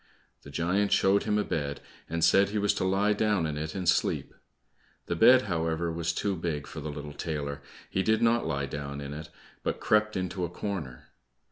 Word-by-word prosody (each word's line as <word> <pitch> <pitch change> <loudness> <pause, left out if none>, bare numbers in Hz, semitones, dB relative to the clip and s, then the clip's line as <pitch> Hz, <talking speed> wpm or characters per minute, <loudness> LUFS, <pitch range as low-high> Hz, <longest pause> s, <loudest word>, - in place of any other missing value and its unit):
The - - -12
giant 90 +8 0
showed 100 +1 +3
him 105 -1 +1
a 105 - +2
bed, 70 -6 -2 0.3
and 85 +1 -1
said 100 +1 +5
he 105 - -2
was 105 -1 +2
to - - -2
lie 100 +3 +2
down 105 -4 +1
in 75 -2 -2
it 75 +1 -4
and 95 -2 -3
sleep. - - +1 0.7
The 85 - -2
bed, 125 +9 +7
however, 85 -3 -1
was 85 +1 -1
too 100 -2 -1
big 80 -4 -3
for - - -8
the 75 +1 -5
little 75 0 -7
tailor; 70 -2 -4 0.3
he 95 - 0
did 110 +3 +2
not 115 +1 +3
lie 70 0 -1
down 70 0 -5
in 70 0 -6
it, 75 +1 -7 0.3
but - - -2
crept 105 -1 +2
into 90 0 -2
a 85 - -1
corner. 85 -9 -5
85 Hz, 205 wpm, -28 LUFS, 75-100 Hz, 0.7 s, bed